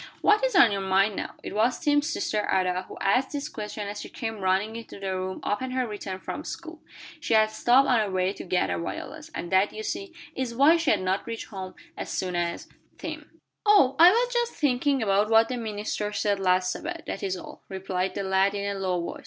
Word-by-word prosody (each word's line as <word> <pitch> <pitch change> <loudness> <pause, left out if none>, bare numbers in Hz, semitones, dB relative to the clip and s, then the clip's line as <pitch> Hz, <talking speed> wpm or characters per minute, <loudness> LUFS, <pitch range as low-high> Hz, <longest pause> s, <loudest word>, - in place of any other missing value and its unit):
"What 420 +3 +4
is - - +1
on 230 - +7
your 200 -1 -1
mind, 195 +2 +2
now?" - - -5
It - - -6
was 225 +4 +2
Tim's 295 -1 +2
sister 210 -10 -1
Ada 185 -1 +1
who - - -10
asked 250 +8 +1
this 290 0 -3
question 210 -5 -6
as 205 +1 -5
she - - -8
came 225 -3 -5
running 195 +3 +1
into 230 -3 -9
the 190 -1 -3
room 185 0 -4
upon 255 +6 -1
her 255 0 0
return 205 -4 -5
from 295 - -6
school. 325 0 -8 0.4
She 260 - +1
had 215 0 +4
stopped 240 +5 +4
on 245 -3 +4
her 210 -2 0
way 185 0 0
to - - -8
gather 180 0 0
violets, 295 - -6
and 175 - -5
that, 190 +2 +3
you 220 - -7
see, 390 - -4 0.2
is 255 -3 -3
why 290 +6 +6
she 330 -4 0
had 205 - +3
not 190 +1 -1
reached 230 -1 -5
home 190 -3 -7 0.2
as - - -6
soon 180 -1 -2
as 170 0 -2 0.3
Tim. - - -7 0.3
"Oh, 400 -11 +5
I 340 +2 +10
was 485 +5 +2
just 475 -1 0
thinking 275 -2 +1
about 205 +1 +2
what 225 0 +5
the 250 - -2
minister 210 -2 -3
said 205 -1 0
last 185 -1 +2
Sabbath, 340 - -5
that - - -5
is 190 -1 -2
all," - - -11
replied 190 -1 -3
the 200 - -2
lad 190 +1 +2
in 200 0 -2
a - - -6
low 185 -2 0
voice. 170 - -5
210 Hz, 225 wpm, -26 LUFS, 190-265 Hz, 0.4 s, I